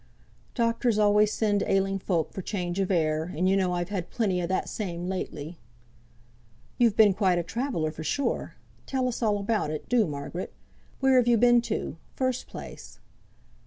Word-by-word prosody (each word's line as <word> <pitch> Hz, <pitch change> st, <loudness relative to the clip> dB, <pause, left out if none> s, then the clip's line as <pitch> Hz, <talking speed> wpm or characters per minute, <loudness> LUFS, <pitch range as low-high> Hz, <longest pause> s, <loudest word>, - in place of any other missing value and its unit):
"Doctors 230 Hz, -1 st, +1 dB
always 210 Hz, 0 st, +4 dB
send 205 Hz, -2 st, +1 dB
ailing 195 Hz, 0 st, +1 dB
folk 170 Hz, -4 st, -1 dB
for 190 Hz, -, -4 dB
change 180 Hz, -2 st, -3 dB
of 195 Hz, -, 0 dB
air! 160 Hz, -2 st, 0 dB
and 180 Hz, +3 st, +2 dB
you 190 Hz, -, +3 dB
know 185 Hz, -2 st, +1 dB
I've 175 Hz, +1 st, -2 dB
had 190 Hz, -4 st, -3 dB
plenty 195 Hz, -6 st, 0 dB
o' 170 Hz, -, -2 dB
that 185 Hz, -, -1 dB
same 175 Hz, -5 st, -4 dB
lately." 170 Hz, -3 st, -5 dB, 1.2 s
"You've 230 Hz, -4 st, +4 dB
been 210 Hz, -3 st, +6 dB
quite 185 Hz, -2 st, +2 dB
a 175 Hz, -, 0 dB
traveller 205 Hz, -, -2 dB
for 155 Hz, 0 st, -8 dB
sure! 280 Hz, -, -2 dB, 0.3 s
Tell 260 Hz, -1 st, 0 dB
us 250 Hz, -, -3 dB
all 210 Hz, -3 st, +2 dB
about 205 Hz, -4 st, -1 dB
it, 155 Hz, 0 st, -5 dB
do, 240 Hz, -5 st, +3 dB
Margaret. 145 Hz, +4 st, -5 dB, 0.5 s
Where 265 Hz, -1 st, +5 dB
have 245 Hz, -1 st, +4 dB
you 240 Hz, -1 st, +5 dB
been 240 Hz, +1 st, +5 dB
to, -, -, -3 dB, 0.2 s
first 255 Hz, -1 st, -1 dB
place?" -, -, -10 dB
195 Hz, 175 wpm, -27 LUFS, 175-230 Hz, 1.2 s, been